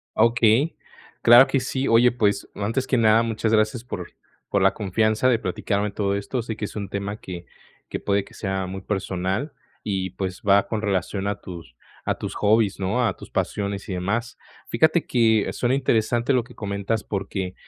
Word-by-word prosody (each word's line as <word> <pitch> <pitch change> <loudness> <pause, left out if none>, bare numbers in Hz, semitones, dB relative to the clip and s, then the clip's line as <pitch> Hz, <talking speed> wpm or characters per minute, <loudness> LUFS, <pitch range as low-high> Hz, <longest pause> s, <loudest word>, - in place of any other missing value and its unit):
Ah, 110 - +4
okey, 120 +6 +3 0.5
claro 120 +3 +8
que 135 - +1
sí. 130 +1 -2
Oye, 120 +2 +5
pues, 105 -4 0
antes 115 +6 -2
que 125 - +2
nada, 115 0 +5
muchas 115 -1 -1
gracias 110 +2 +2
por 90 -7 -6 0.4
por 100 - +1
la 95 - +4
confianza 110 +4 +1
de 120 -3 +3
platicarme 100 +2 -2
todo 100 -1 -1
esto. 115 +5 -3
Sé 110 -1 -5
que 110 - -8
es - - -9
un 100 -2 -4
tema 100 +1 -4
que 90 -4 -8 0.4
que - - -4
puede 100 -1 0
que - - -18
sea 95 -2 -3
muy 95 +1 -6
personal 95 - -2 0.3
y, 95 -2 -2
pues, 95 -2 -5
va 100 0 +4
con 110 -1 -2
relación 100 0 -1
a 100 - -2
tus 85 -9 -10 0.3
a - - +2
tus - - -6
hobbies, 105 -1 +2
¿no?, 110 +6 +1
a - - -1
tus - - -11
pasiones 100 -1 -2
y - - -2
demás. 105 +7 -2 0.3
Fíjate - - +3
que 110 -3 +2
suena 125 +2 0
interesante 120 -1 +1
lo 125 -3 +2
que 125 - -16
comentas, 100 +1 -2
porque 95 -2 -4
105 Hz, 190 wpm, -23 LUFS, 95-115 Hz, 0.5 s, claro